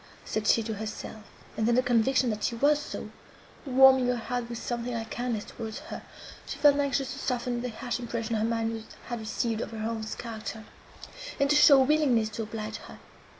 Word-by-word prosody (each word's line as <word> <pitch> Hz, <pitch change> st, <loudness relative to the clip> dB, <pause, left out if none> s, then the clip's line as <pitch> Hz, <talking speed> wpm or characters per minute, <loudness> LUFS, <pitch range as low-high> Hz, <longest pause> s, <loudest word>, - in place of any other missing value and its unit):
said 215 Hz, 0 st, -2 dB
she 230 Hz, -, +4 dB
to 220 Hz, 0 st, -3 dB
herself; 215 Hz, +1 st, -6 dB, 0.3 s
and 220 Hz, -, 0 dB
then 235 Hz, -, +3 dB
the 255 Hz, -, +3 dB
conviction 250 Hz, +1 st, +3 dB
that 210 Hz, -1 st, -4 dB
she 235 Hz, -, 0 dB
was 290 Hz, +5 st, +3 dB
so, 295 Hz, -, -7 dB, 0.6 s
warming 265 Hz, -1 st, +6 dB
her 250 Hz, -, +2 dB
heart 240 Hz, 0 st, -3 dB
with 235 Hz, -, -5 dB
something 240 Hz, +1 st, -3 dB
like 225 Hz, -1 st, -5 dB
kindness 240 Hz, -4 st, -2 dB
towards 220 Hz, -1 st, -7 dB
her, 310 Hz, +3 st, -8 dB, 0.5 s
she -, -, -5 dB
felt 285 Hz, 0 st, +5 dB
anxious 275 Hz, -1 st, 0 dB
to -, -, -8 dB
soften 245 Hz, -1 st, -1 dB
the 250 Hz, -, -3 dB
harsh 230 Hz, +1 st, -4 dB
impression 230 Hz, -1 st, -3 dB
her 215 Hz, -, 0 dB
mind 225 Hz, -1 st, -1 dB, 0.3 s
had 240 Hz, -1 st, -3 dB
received 220 Hz, +1 st, -2 dB
of -, -, -4 dB
her 225 Hz, -, -8 dB
aunt's 220 Hz, -1 st, -4 dB
character, 220 Hz, -1 st, -6 dB, 0.7 s
and 280 Hz, 0 st, +3 dB
to -, -, +5 dB
show 290 Hz, -2 st, +8 dB
a -, -, 0 dB
willingness 260 Hz, -7 st, +3 dB
to 220 Hz, +1 st, -5 dB
oblige 215 Hz, 0 st, -5 dB
her. -, -, -12 dB
235 Hz, 200 wpm, -28 LUFS, 220-255 Hz, 0.7 s, show